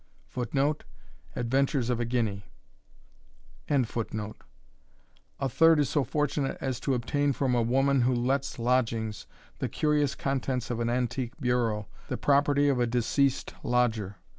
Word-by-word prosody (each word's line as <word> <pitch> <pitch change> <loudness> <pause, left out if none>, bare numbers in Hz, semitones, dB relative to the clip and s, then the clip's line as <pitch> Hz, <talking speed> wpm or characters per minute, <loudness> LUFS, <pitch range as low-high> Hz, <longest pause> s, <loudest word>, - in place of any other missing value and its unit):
[Footnote: 135 - -1 0.5
Adventures 130 0 +1
of 120 - -1
a 120 - 0
Guinea.] 110 -5 -1 1.2
A 140 -4 +3 1.6
third 165 +4 +5
is 145 -4 +2
so 145 - +1
fortunate 145 +1 -1
as 130 -3 -2
to 135 0 0
obtain 140 +4 0
from 130 -1 0
a 120 - +3
woman 135 +3 +2
who 125 +1 +2
lets 130 +3 0
lodgings, 115 -3 0 0.3
the - - -2
curious 150 -2 +1
contents 130 -3 -2
of 120 - -2
an 115 0 0
antique 125 +1 -2
bureau, 120 -5 0 0.2
the - - -3
property 145 0 +3
of 135 -3 +2
a 120 - +2
deceased 125 +3 +1
lodger. 115 -5 0
125 Hz, 135 wpm, -28 LUFS, 120-140 Hz, 1.6 s, third